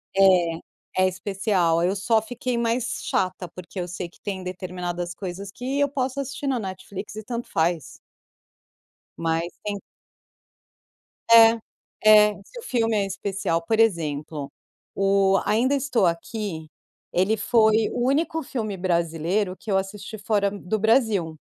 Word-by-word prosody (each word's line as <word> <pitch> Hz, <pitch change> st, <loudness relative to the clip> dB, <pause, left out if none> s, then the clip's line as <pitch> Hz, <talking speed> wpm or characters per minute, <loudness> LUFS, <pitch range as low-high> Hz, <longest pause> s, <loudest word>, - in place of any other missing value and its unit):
É, 185 Hz, -2 st, +2 dB
é -, -, +5 dB
especial, 185 Hz, -3 st, 0 dB
eu 185 Hz, +3 st, +1 dB
só 220 Hz, +3 st, +2 dB
fiquei 245 Hz, +2 st, -3 dB
mais 235 Hz, +1 st, -1 dB
chata 185 Hz, -1 st, -1 dB
porque 175 Hz, +2 st, -9 dB
eu 175 Hz, -, -3 dB
sei 180 Hz, 0 st, -5 dB
que -, -, -24 dB
tem 195 Hz, -2 st, -4 dB
determinadas 180 Hz, -1 st, -4 dB
coisas 190 Hz, +1 st, -6 dB
que 260 Hz, +7 st, -3 dB
eu 285 Hz, 0 st, +3 dB
posso 265 Hz, -1 st, -2 dB
assistir 275 Hz, +1 st, -4 dB
no 260 Hz, -3 st, +1 dB
Netflix 190 Hz, +1 st, -7 dB
e 215 Hz, -, -6 dB
tanto 235 Hz, +2 st, -5 dB
faz. 165 Hz, -1 st, -1 dB, 1.2 s
Mas 165 Hz, +1 st, 0 dB, 0.2 s
tem 205 Hz, -1 st, -2 dB, 1.5 s
É 230 Hz, 0 st, +8 dB, 0.5 s
é, 210 Hz, -1 st, +7 dB
se 485 Hz, -, -11 dB
o -, -, -10 dB
filme 230 Hz, -, +1 dB
é 205 Hz, -2 st, +2 dB
especial 195 Hz, -3 st, -2 dB
Por 220 Hz, +4 st, +1 dB
exemplo, 155 Hz, -8 st, 0 dB, 0.4 s
o 195 Hz, 0 st, +3 dB
Ainda 245 Hz, +6 st, +2 dB
Estou 270 Hz, -7 st, +1 dB
Aqui, 170 Hz, -1 st, -3 dB, 0.4 s
ele 190 Hz, +5 st, +2 dB
foi 220 Hz, 0 st, +3 dB
o 240 Hz, -, -1 dB
único 320 Hz, +3 st, +1 dB
filme 220 Hz, -7 st, -4 dB
brasileiro 175 Hz, +2 st, 0 dB
que 215 Hz, -, -6 dB
eu 195 Hz, -, +3 dB
assisti 200 Hz, +3 st, -5 dB
fora 205 Hz, -1 st, +1 dB
do 205 Hz, +1 st, -3 dB
Brasil 215 Hz, -7 st, +2 dB
200 Hz, 140 wpm, -24 LUFS, 180-225 Hz, 1.5 s, É